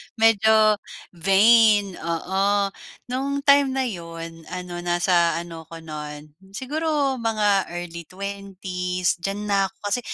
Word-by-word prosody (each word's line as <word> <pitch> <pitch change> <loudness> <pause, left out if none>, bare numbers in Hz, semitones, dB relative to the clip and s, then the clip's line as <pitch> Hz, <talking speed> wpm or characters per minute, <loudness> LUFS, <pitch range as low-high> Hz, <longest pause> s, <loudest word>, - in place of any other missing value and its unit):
medyo 220 -1 +4 0.3
vain, 205 +3 +5
oo. 170 +3 -2 0.7
No'ng 280 +2 -2
time 280 -1 +5
na 265 - +1
'yon, 165 -6 -7
ano, 180 -1 -6
nasa 175 0 +2
ano 165 -2 -7
ako 165 0 -10
no'n, 150 -1 -8 0.2
siguro 285 0 -1
mga 210 -4 +1
early 170 -1 -7
20's 185 -2 -3
diyan 195 +3 -3
na 195 -1 +3
ko. - - -20 0.2
Kasi 245 - +1
195 Hz, 120 wpm, -23 LUFS, 170-220 Hz, 0.7 s, vain